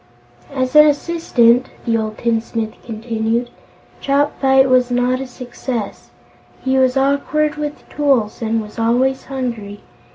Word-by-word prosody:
"As 260 0 -2
an 300 0 +9
assistant," 275 -6 +2 0.2
the 230 -2 +1
old 215 -1 -2
tinsmith 225 -1 -2
continued, 230 +1 -2 0.5
"Chopfyt 275 -1 +2
was 255 -1 +3
not 245 +1 +1
a 270 - -5
success. 245 -3 -6 0.5
He 265 0 -1
was 260 0 +2
awkward 280 +2 +1
with 300 0 -6
tools 270 -8 0
and 225 0 -1
was 210 +1 -11
always 250 +4 +1
hungry. 235 -7 -5
250 Hz, 125 wpm, -18 LUFS, 230-270 Hz, 0.5 s, an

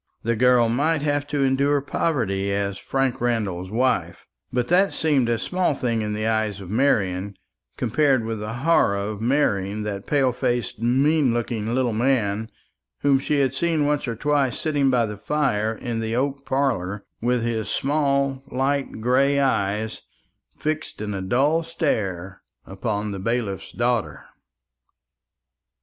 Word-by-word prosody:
The 115 +1 +1
girl 125 0 +4
might 145 +6 +1
have 145 -1 0
to 145 -1 0
endure 140 +2 +2
poverty 115 - -1
as 100 -1 -2
Frank 135 0 -1
Randall's 105 -7 -1
wife; 125 +5 0 0.3
but 125 -1 0
that 190 +3 +3
seemed 145 -7 +2
a 120 - +2
small 180 +5 0
thing 115 -4 -1
in 105 0 -2
the 110 +1 -2
eyes 110 -3 0
of 95 -1 -9
Marian, 100 -6 +1 0.4
compared 130 0 +2
with 115 -1 -3
the 105 +1 -4
horror 165 -11 +4
of 100 +1 -4
marrying 105 -6 +1
that 100 -2 -5
pale 135 -3 +2
faced 120 -1 -2
mean 135 +2 +2
looking 115 -1 -2
little 130 -3 +1
man, 110 -3 0 0.5
whom 140 -1 +4
she 140 +1 +1
had 135 -1 +1
seen 160 0 +1
once 145 -1 0
or 115 - -2
twice 140 0 +1
sitting 145 -3 +1
by 125 -3 +3
the 105 -1 -6
fire 110 -4 0
in 115 +1 -4
the 110 0 -2
oak 140 +2 -2
parlour, 105 -8 -1 0.2
with 120 0 +1
his 115 -2 -2
small 140 -2 0
light 135 -2 -1
grey 135 +4 +3
eyes 110 -5 0 0.6
fixed 155 0 -3
in 105 -1 -3
a 95 - -3
dull 135 - +2
stare 100 - -2 0.2
upon 105 +2 -3
the 100 - -5
bailiff's 105 -1 -2
daughter. 120 -2 -1
120 Hz, 150 wpm, -23 LUFS, 105-140 Hz, 0.6 s, girl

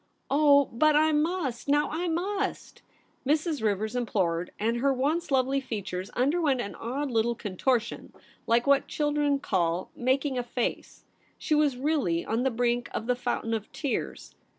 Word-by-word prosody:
'Oh, 285 -1 +5
but 305 +6 +4
I 310 +1 +4
mus^ 300 -5 -1
now 290 +1 +3
— - - -8
I 345 +3 -1
must!'' 390 +4 -3 0.4
Mrs. 300 +1 0
Rivers 215 +2 -1
implored, 180 -8 0
and 230 +3 0
her 275 +3 +2
once 295 +7 0
lovely 270 0 +2
features 195 -6 -5
underwent 285 0 +2
an 205 -4 -4
odd 270 +4 -4
little 235 +1 +1
contortion 225 +4 -1 0.4
like 235 +1 +3
what 280 0 +3
children 295 -1 +1
call 175 -8 -1
' - - -39
making 260 +1 0
a - - -1
face.' 245 0 -4 0.3
She - - -1
was 300 -4 +3
really 260 - 0
on 225 +2 -1
the 265 - +2
brink 240 0 0
of 220 - -3
the 250 +1 +1
fountain 240 -2 -2
of 220 -2 -4
tears. 285 -4 -4
260 Hz, 165 wpm, -27 LUFS, 230-295 Hz, 0.4 s, Oh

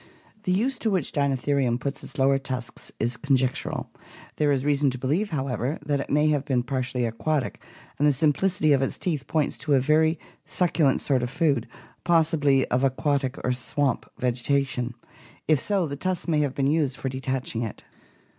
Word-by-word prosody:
The 185 - +1
use 240 +8 +1
to 225 - 0
which 185 -8 0
Dinotherium 140 -3 +1
put 140 +1 -4
its - - -10
lower 135 0 +3
tusks 130 -2 -6
is 115 +1 -1
conjectural; 130 -2 -1 0.5
there 150 -1 +2
is 135 -1 0
reason 145 -1 +3
to 130 - -4
believe, 155 - 0
however, 135 -1 -2
that 145 -1 0
it - - -5
may 150 +2 +3
have 145 -3 +1
been 130 -4 0
partially 130 -1 -1
aquatic 130 +5 -2 0.4
and 145 - +4
the - - +6
simplicity 155 +3 +2
of 135 - +3
its 135 - -1
teeth 155 -7 -2
points 155 -3 0
to 140 +1 +2
a - - +5
very 155 +4 +3 0.3
succulent 165 -6 +1
sort 135 -3 +1
of 120 - -2
food, 140 -6 +1 0.4
possibly 155 -5 +3
of 125 +2 +1
aquatic 135 0 0
or 125 - +1
swamp 130 +1 -1
vegetation; 125 0 0 0.5
if 155 -3 +4
so, 195 0 +1
the 140 -2 -4
tusks 185 +5 -2
may 155 -3 +2
have 145 -3 0
been 135 - 0
used 140 -2 +1
for - - -4
detaching 130 -2 -3
it. 115 -4 -5
140 Hz, 180 wpm, -25 LUFS, 130-155 Hz, 0.5 s, the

